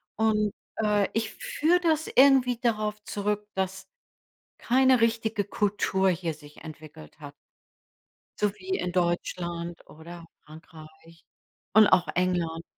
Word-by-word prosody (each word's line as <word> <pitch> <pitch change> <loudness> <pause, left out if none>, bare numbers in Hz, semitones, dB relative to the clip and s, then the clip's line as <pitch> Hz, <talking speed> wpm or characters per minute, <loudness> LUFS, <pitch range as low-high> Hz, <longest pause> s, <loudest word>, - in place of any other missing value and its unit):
Und, 215 -1 +1 0.3
äh, 210 -2 +1
ich 220 0 -2
führe 335 +4 0
das 320 -2 +1
irgendwie 260 -2 +4
darauf 215 -3 -1
zurück, 210 0 -3
dass 190 0 -3 0.7
keine 260 0 +3
richtige 225 -2 0
Kultur 195 -1 0
hier 170 -2 -2
sich 150 -1 -16
entwickelt 155 - -12
hat. - - -10 1.1
so 210 -1 +1
wie 370 - -13
in 180 - -3
Deutschland 175 -1 -3
oder 170 +2 -12 0.2
Frankreich 160 +1 -15 0.5
und 215 0 +7
auch 175 - +3
England. 175 -2 -1
195 Hz, 115 wpm, -26 LUFS, 170-220 Hz, 1.1 s, und